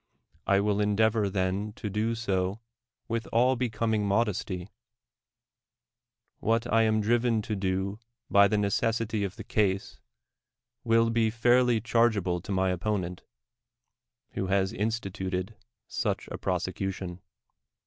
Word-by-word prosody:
I 100 Hz, 0 st, +4 dB
will 105 Hz, 0 st, +1 dB
endeavor 105 Hz, 0 st, +2 dB
then 95 Hz, +2 st, -1 dB
to 110 Hz, -, -6 dB
do 110 Hz, +3 st, -1 dB
so 100 Hz, -2 st, -1 dB, 0.5 s
with 115 Hz, 0 st, -2 dB
all 125 Hz, +3 st, +3 dB
becoming 110 Hz, -3 st, 0 dB
modesty; 100 Hz, -3 st, -1 dB, 1.7 s
what 115 Hz, +1 st, +1 dB
I 115 Hz, -, +5 dB
am 110 Hz, -1 st, +2 dB
driven 115 Hz, 0 st, +2 dB
to 105 Hz, -, -3 dB
do 95 Hz, +1 st, -2 dB, 0.3 s
by 100 Hz, 0 st, +6 dB
the 105 Hz, +1 st, +1 dB
necessity 110 Hz, +1 st, 0 dB
of 95 Hz, -1 st, -3 dB
the -, -, -8 dB
case, 100 Hz, -2 st, 0 dB, 0.8 s
will 115 Hz, 0 st, +3 dB
be 115 Hz, -1 st, +2 dB
fairly 120 Hz, +1 st, +3 dB
chargeable 110 Hz, -6 st, +1 dB
to 100 Hz, -, -7 dB
m}' 95 Hz, -, 0 dB, 0.2 s
opponent, 90 Hz, -1 st, -2 dB, 1.1 s
who 95 Hz, -, -3 dB
has 95 Hz, +1 st, +1 dB
in 105 Hz, -1 st, 0 dB
stituted 95 Hz, -3 st, -3 dB, 0.3 s
such -, -, -2 dB
a -, -, -4 dB
prosecution. 95 Hz, 0 st, -3 dB
105 Hz, 125 wpm, -28 LUFS, 95-115 Hz, 1.7 s, by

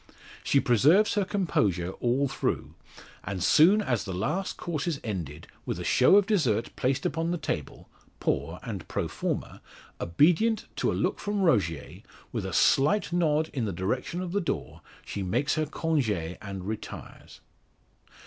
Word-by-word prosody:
She 140 Hz, -, +3 dB
preserves 150 Hz, -, +4 dB
her 205 Hz, -, +2 dB
composure 105 Hz, -, 0 dB
all 130 Hz, +4 st, +1 dB
through, 135 Hz, -, -2 dB, 0.5 s
and 95 Hz, -2 st, -3 dB
soon 190 Hz, -, +5 dB
as 120 Hz, -, 0 dB
the 95 Hz, -3 st, -5 dB
last 175 Hz, -, -2 dB
course 170 Hz, -3 st, -3 dB
is 155 Hz, -5 st, -1 dB
ended, 80 Hz, -, -5 dB, 0.2 s
with -, -, -4 dB
a -, -, -4 dB
show 130 Hz, +9 st, +5 dB
of 205 Hz, -1 st, +6 dB
dessert 140 Hz, -, 0 dB
placed 130 Hz, +2 st, 0 dB
upon 165 Hz, +2 st, -1 dB
the 175 Hz, -, 0 dB
table 135 Hz, -, -5 dB, 0.3 s
poor -, -, -1 dB
and -, -, -6 dB
pro -, -, -2 dB
forma -, -, -4 dB, 0.4 s
obedient 175 Hz, -, +2 dB
to -, -, +1 dB
a -, -, -2 dB
look -, -, 0 dB
from 205 Hz, -1 st, -1 dB
Rogier, 85 Hz, -, 0 dB, 0.3 s
with -, -, -3 dB
a -, -, -5 dB
slight 170 Hz, +7 st, +3 dB
nod 160 Hz, -2 st, +1 dB
in 125 Hz, -5 st, -1 dB
the 105 Hz, -, -2 dB
direction 125 Hz, -, -2 dB
of 180 Hz, -2 st, -4 dB
the 200 Hz, +2 st, 0 dB
door, 170 Hz, -, -4 dB, 0.2 s
she 100 Hz, -, -5 dB
makes 115 Hz, +9 st, 0 dB
her 155 Hz, -1 st, 0 dB
conge, 155 Hz, -5 st, 0 dB
and 95 Hz, +1 st, -4 dB
retires. 110 Hz, 0 st, -8 dB
140 Hz, 160 wpm, -27 LUFS, -, 0.5 s, of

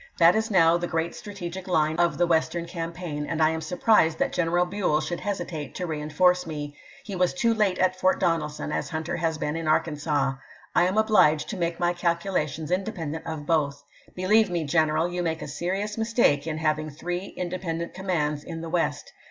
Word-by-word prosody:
That 170 Hz, +2 st, +6 dB
is 220 Hz, +1 st, 0 dB
now 170 Hz, -4 st, +5 dB
the 175 Hz, -, -2 dB
great 165 Hz, +1 st, -1 dB
strategic 190 Hz, -3 st, -7 dB
line 155 Hz, -3 st, +2 dB
of 175 Hz, 0 st, +2 dB
the 175 Hz, -, +3 dB
Western 170 Hz, 0 st, +1 dB
campaign, 165 Hz, -3 st, -5 dB
and 165 Hz, -, -2 dB
I 155 Hz, 0 st, +4 dB
am 160 Hz, 0 st, -3 dB
surprised 165 Hz, 0 st, +3 dB
that -, -, 0 dB
General 175 Hz, +1 st, +2 dB
Buell 180 Hz, -5 st, 0 dB
should 165 Hz, +3 st, -3 dB
hesitate 175 Hz, -8 st, -4 dB
to 180 Hz, -, -3 dB
reen 155 Hz, -2 st, -4 dB
force 180 Hz, +2 st, +3 dB
me. 145 Hz, -2 st, -5 dB, 0.3 s
He 200 Hz, -, -6 dB
was 180 Hz, -1 st, +1 dB
too 235 Hz, -4 st, +2 dB
late 205 Hz, -4 st, +1 dB
at 185 Hz, 0 st, +1 dB
Fort 185 Hz, 0 st, +3 dB
Donelson, 155 Hz, -4 st, -1 dB
as -, -, -2 dB
Hunter 160 Hz, -1 st, -3 dB
has 165 Hz, -1 st, -1 dB
been 150 Hz, 0 st, -2 dB
in 165 Hz, -1 st, -3 dB
Arkansas. 150 Hz, -3 st, +1 dB, 0.4 s
I 175 Hz, -, +4 dB
am 190 Hz, +3 st, -1 dB
obliged 185 Hz, -9 st, +4 dB
to -, -, -3 dB
make 170 Hz, -1 st, -2 dB
my 175 Hz, 0 st, +2 dB
calcula 175 Hz, -1 st, 0 dB
tions 155 Hz, +3 st, -6 dB
independent 170 Hz, -5 st, -3 dB
of 155 Hz, -2 st, -5 dB
both. 145 Hz, -3 st, 0 dB, 0.3 s
Believe 205 Hz, +3 st, +3 dB
me, 175 Hz, -2 st, -1 dB
general, 155 Hz, +2 st, +2 dB
you 175 Hz, 0 st, -3 dB
make 160 Hz, -2 st, -2 dB
a -, -, -6 dB
serious 195 Hz, +8 st, -3 dB
mistake 220 Hz, -, +2 dB
in 155 Hz, -1 st, -2 dB
having 155 Hz, -1 st, 0 dB
three 175 Hz, +5 st, -4 dB
independent 175 Hz, -2 st, -3 dB
commands 155 Hz, -6 st, -1 dB
in 165 Hz, -1 st, -6 dB
the 165 Hz, -, -6 dB
West. 170 Hz, 0 st, -1 dB
170 Hz, 200 wpm, -26 LUFS, 155-180 Hz, 0.4 s, That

